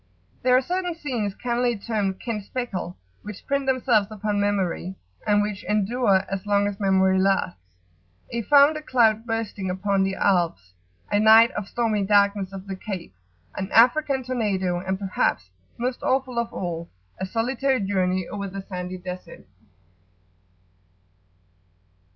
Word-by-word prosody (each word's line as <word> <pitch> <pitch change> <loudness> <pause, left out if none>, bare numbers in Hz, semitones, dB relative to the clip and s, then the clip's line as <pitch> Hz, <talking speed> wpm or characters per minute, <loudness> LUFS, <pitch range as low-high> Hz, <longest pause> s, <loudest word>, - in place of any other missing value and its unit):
There 250 +1 +4
are 260 - +1
certain 355 +3 -2
scenes, 240 -11 -3
cannily 240 -1 0
termed 200 -3 -2
"Ken 225 -3 -3
speckle," 195 -5 -5 0.2
which 210 -1 -9
print 280 -1 -1
themselves 245 -6 +2
upon 210 -1 -2
Memory, 190 -2 -1 0.3
and 205 0 +4
which 210 -1 -4
endure 210 -1 +2
as 195 -1 -4
long 205 0 +3
as 205 -1 -3
Memory 190 -1 +3
lasts, 190 - +1 0.7
a 235 - -2
thunder 290 +5 +5
cloud 230 -5 +2
bursting 220 -4 -3
upon 195 +2 0
the 190 0 -1
Alps, 170 - 0 0.4
a 205 - +3
night 220 +2 +7
of 205 -1 -5
stormy 220 -2 0
darkness 200 -1 +2
off 195 -1 -8
the 195 -1 -5
Cape, 185 - -7 0.4
an 190 0 -4
African 265 +3 +4
tornado, 200 -8 -1
and, 190 +1 -2
perhaps, 145 - -1 0.3
most 245 +1 -3
awful 260 -2 0
of 235 - -2
all, 170 -2 -4 0.3
a 190 - -2
solitary 255 +5 0
journey 185 -2 0
over 200 -1 -5
the 195 0 -7
sandy 180 -1 -6
Desert. 180 - -9
205 Hz, 140 wpm, -24 LUFS, 190-235 Hz, 0.7 s, night